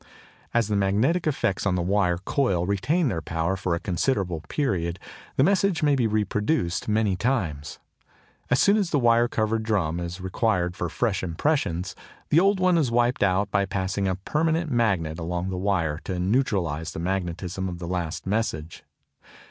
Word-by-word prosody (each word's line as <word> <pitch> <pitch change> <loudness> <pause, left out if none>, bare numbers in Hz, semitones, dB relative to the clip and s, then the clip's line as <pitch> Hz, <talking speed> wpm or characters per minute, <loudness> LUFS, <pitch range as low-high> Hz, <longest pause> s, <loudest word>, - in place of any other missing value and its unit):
As 115 -3 +2
the 105 - 0
magnetic 110 - +1
effects 120 -10 0
on 90 - +1
the 90 - 0
wire 90 -2 +2
coil 95 -2 0
retain 140 - +1
their 95 -9 -1
power 80 +4 -1
for 95 -2 -1
a - - -3
considerable 90 - -1
period, 90 - -1 0.4
the 130 - +4
message 190 -1 +2
may 145 -1 +4
be 125 -4 +2
reproduced 105 - 0
many 105 -2 +2
times. 90 - -2 0.7
As 125 - +3
soon 200 +1 +5
as 200 -5 0
the 150 - +1
wire 120 -2 +4
covered 110 -1 0
drum 95 -7 0
is 85 +1 -5
required 95 -1 0
for 90 - -3
fresh 105 0 -1
impressions, 90 - -1 0.3
the 155 - +5
old 195 +1 +3
one 185 -2 +3
is 140 -6 +1
wiped 120 +1 +1
out 100 +1 +2
by 100 0 +2
passing 95 0 -1
a 95 - 0
permanent 160 - 0
magnet 95 -10 +1
along 90 +2 -3
the - - -3
wire 85 -6 0
to 95 - -3
neutralise 90 - 0
the - - -5
magnetism 90 +1 -3
of 90 - -6
the 85 0 -6
last 85 -3 -3
message. 95 -6 -2
100 Hz, 170 wpm, -25 LUFS, 90-120 Hz, 0.7 s, soon